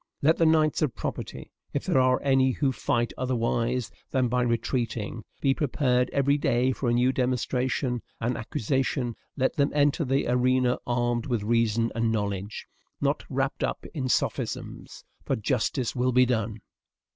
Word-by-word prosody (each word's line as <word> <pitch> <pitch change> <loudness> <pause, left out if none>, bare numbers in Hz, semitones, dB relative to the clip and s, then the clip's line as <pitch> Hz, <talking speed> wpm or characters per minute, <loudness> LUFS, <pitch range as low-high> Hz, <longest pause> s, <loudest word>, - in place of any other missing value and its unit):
Let 160 +3 +4
the 165 - +4
knights 155 -1 +3
of 145 -6 0
property, - - -5 0.2
if - - -2
there - - +3
are 130 0 +3
any 135 -1 +3
who 135 0 +1
fight 120 -2 -1
otherwise 120 -1 0 0.2
than 130 -3 +1
by 125 +1 +1
retreating, 115 -2 -1 0.2
be 135 -1 +3
prepared 125 -3 +1
every 140 +1 +2
day 125 -1 +2
for 125 -1 -2
a - - +2
new 125 +2 +3
demonstration 125 0 -1 0.2
and 120 +2 -1
accusation; 120 +2 -1 0.2
let 130 0 +1
them 140 0 +3
enter 145 +2 +3
the 135 0 0
arena 125 0 +2
armed 120 -1 0
with 120 -5 -1
reason 115 0 +1
and 115 -1 +1
knowledge, 100 -1 -3 0.3
not - - 0
wrapped - - -1
up - - -2
in 130 -4 -2
sophisms, - - -2 0.2
for - - 0
justice 120 +3 -1
will 125 +1 +1
be 125 +1 +5
done. 110 -3 -1
125 Hz, 155 wpm, -27 LUFS, 115-130 Hz, 0.3 s, be